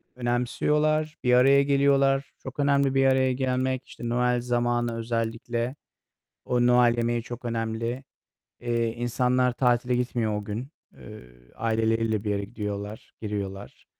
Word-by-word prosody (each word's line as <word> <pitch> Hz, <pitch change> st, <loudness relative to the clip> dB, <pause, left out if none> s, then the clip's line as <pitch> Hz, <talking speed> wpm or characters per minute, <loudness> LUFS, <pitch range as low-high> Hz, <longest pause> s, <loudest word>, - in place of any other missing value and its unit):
önemsiyorlar, 150 Hz, +6 st, 0 dB
bir 125 Hz, 0 st, +3 dB
araya 135 Hz, +3 st, +6 dB
geliyorlar. 140 Hz, -1 st, +2 dB
Çok 130 Hz, +2 st, -8 dB
önemli 140 Hz, -1 st, +2 dB
bir 135 Hz, 0 st, +4 dB
araya 130 Hz, -1 st, +3 dB
gelmek, 130 Hz, 0 st, -1 dB
işte, 120 Hz, -, -7 dB
Noel 125 Hz, 0 st, +1 dB
zamanı 120 Hz, -1 st, 0 dB
özellikle, 115 Hz, +2 st, -2 dB, 0.7 s
o 120 Hz, 0 st, +1 dB
Noel 120 Hz, -1 st, +4 dB
yemeği 120 Hz, 0 st, 0 dB
çok 120 Hz, +1 st, -8 dB
önemli. 115 Hz, +2 st, -3 dB, 0.6 s
Eee, 120 Hz, -1 st, 0 dB
insanlar 125 Hz, +1 st, +1 dB
tatile 125 Hz, 0 st, +1 dB
gitmiyor 120 Hz, -4 st, -1 dB
o 105 Hz, -, -4 dB
gün. 110 Hz, +6 st, -5 dB, 0.3 s
Eee, 105 Hz, 0 st, -11 dB, 0.3 s
aileleriyle 115 Hz, -1 st, 0 dB
bir 105 Hz, -, -1 dB
yere 100 Hz, 0 st, -1 dB
gidiyorlar, 105 Hz, -1 st, -6 dB
giriyorlar. 100 Hz, -2 st, -6 dB
120 Hz, 130 wpm, -26 LUFS, 115-130 Hz, 0.7 s, araya